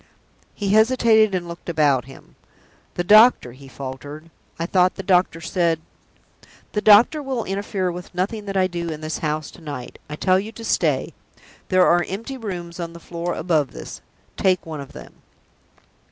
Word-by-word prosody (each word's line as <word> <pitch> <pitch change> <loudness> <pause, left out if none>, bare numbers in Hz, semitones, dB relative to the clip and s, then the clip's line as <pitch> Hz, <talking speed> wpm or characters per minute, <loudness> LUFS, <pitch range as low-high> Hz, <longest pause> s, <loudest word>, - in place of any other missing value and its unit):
He 200 -2 -3
hesitated, 220 -1 +4
and 175 -1 -3
looked 170 +1 -8
about 145 -6 +2
him. 135 - -15 0.6
"The 175 - -1
doctor," 215 - +6
he 135 +3 -14
faltered. 140 +5 -8 0.3
"I 165 - -2
thought 180 +1 +2
the 195 - -6
doctor 180 -3 +2
said 165 -1 0 0.5
" - - -27
"The 210 - 0
doctor 220 +9 +6
will 265 -4 -3
interfere 195 -1 -2
with 180 +1 -9
nothing 205 +4 -2
that 195 -1 -3
I 185 - +4
do 170 -2 -4
in 155 -1 -6
this 155 +1 -4
house 155 -1 -3
to - - -16
night. 145 -6 -8
I 150 - -5
tell 185 +4 +2
you 210 +3 -6
to 225 0 -9
stay. - - 0 0.6
There 185 -1 +5
are 175 0 +4
empty 230 +8 -5
rooms 175 -6 -6
on 170 -1 -5
the 170 - -11
floor 170 +1 -4
above 155 -4 0
this. - - -9 0.4
Take 185 -2 +1
one 155 -3 -6
of 140 - -11
them." - - -11
175 Hz, 180 wpm, -22 LUFS, 160-200 Hz, 0.6 s, doctor